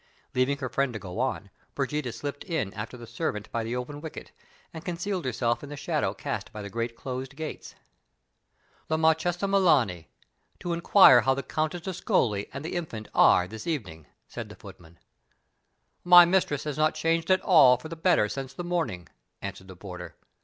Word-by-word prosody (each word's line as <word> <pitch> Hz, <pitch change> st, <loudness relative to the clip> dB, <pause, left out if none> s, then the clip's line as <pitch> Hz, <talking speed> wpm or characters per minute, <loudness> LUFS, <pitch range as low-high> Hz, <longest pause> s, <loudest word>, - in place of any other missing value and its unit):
Leaving 130 Hz, +2 st, +1 dB
her 130 Hz, -2 st, -4 dB
friend 135 Hz, 0 st, -1 dB
to -, -, -4 dB
go 90 Hz, -4 st, -7 dB
on, -, -, -2 dB, 0.2 s
Brigida 150 Hz, -5 st, -2 dB
slipped 145 Hz, +5 st, -6 dB
in 160 Hz, -, -2 dB
after 110 Hz, +4 st, -6 dB
the 120 Hz, -, -10 dB
servant 110 Hz, -2 st, -4 dB
by 115 Hz, -, -2 dB
the 115 Hz, +2 st, -3 dB
open 145 Hz, +4 st, -5 dB
wicket, 160 Hz, -1 st, -8 dB, 0.4 s
and 160 Hz, -, -8 dB
concealed 180 Hz, 0 st, -3 dB
herself 120 Hz, -1 st, 0 dB
in 145 Hz, -, -9 dB
the 145 Hz, -, -7 dB
shadow -, -, -1 dB
cast -, -, -5 dB
by 105 Hz, -, -7 dB
the 100 Hz, -, -8 dB
great 115 Hz, +1 st, -3 dB
closed 130 Hz, +2 st, -6 dB
gates. 155 Hz, 0 st, -7 dB, 1.1 s
"The 160 Hz, -, 0 dB
Marchesa 160 Hz, +3 st, +2 dB
Melani, 150 Hz, -, +2 dB, 0.5 s
to 175 Hz, -1 st, -3 dB
inquire 170 Hz, -6 st, +7 dB
how 135 Hz, 0 st, +2 dB
the 140 Hz, -, -4 dB
Countess 155 Hz, +6 st, -2 dB
d'Ascoli 115 Hz, -, 0 dB
and 140 Hz, +3 st, -7 dB
the -, -, -4 dB
infant 135 Hz, -12 st, -5 dB
are 90 Hz, -, +5 dB
this 110 Hz, +2 st, -9 dB
evening," 90 Hz, -, -4 dB, 0.2 s
said -, -, -7 dB
the -, -, -11 dB
footman. 85 Hz, 0 st, -14 dB, 1.1 s
"My 175 Hz, 0 st, +9 dB
mistress 175 Hz, -5 st, +1 dB
has 150 Hz, -1 st, -4 dB
not 155 Hz, 0 st, +2 dB
changed 165 Hz, +1 st, 0 dB
at 185 Hz, 0 st, +4 dB
all 135 Hz, -9 st, +6 dB
for 160 Hz, -, -9 dB
the 165 Hz, -, -7 dB
better 165 Hz, -, +3 dB
since 135 Hz, +3 st, -6 dB
the 175 Hz, -, -5 dB
morning," 160 Hz, -, -2 dB, 0.3 s
answered 100 Hz, -1 st, -7 dB
the 95 Hz, -, -11 dB
porter. 90 Hz, -1 st, -9 dB
140 Hz, 180 wpm, -27 LUFS, 110-165 Hz, 1.1 s, My